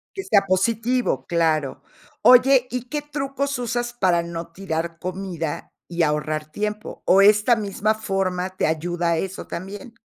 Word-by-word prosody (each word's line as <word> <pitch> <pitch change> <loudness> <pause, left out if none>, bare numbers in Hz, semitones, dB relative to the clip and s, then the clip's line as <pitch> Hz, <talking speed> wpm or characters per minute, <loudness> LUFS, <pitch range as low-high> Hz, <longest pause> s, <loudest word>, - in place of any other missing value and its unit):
Que 390 - -4
sea 200 - +3
positivo, 220 - 0
claro. 160 -4 0 0.4
Oye, 255 0 +6
¿y 250 0 -5
qué 295 +1 -2
trucos 280 -1 -3
usas 240 0 -2
para 180 -7 +2
no 170 0 -6
tirar 165 -2 -4
comida 180 -4 -5 0.2
y 170 -1 0
ahorrar 150 0 -1
tiempo, 210 +3 -4
o 195 - +5
esta 210 +4 +5
misma 210 +1 0
forma 190 -3 -2
te - - 0
ayuda 170 +2 -1
a 165 - +1
eso 190 +2 -5
también? 195 +5 -7
195 Hz, 150 wpm, -23 LUFS, 170-240 Hz, 0.4 s, Oye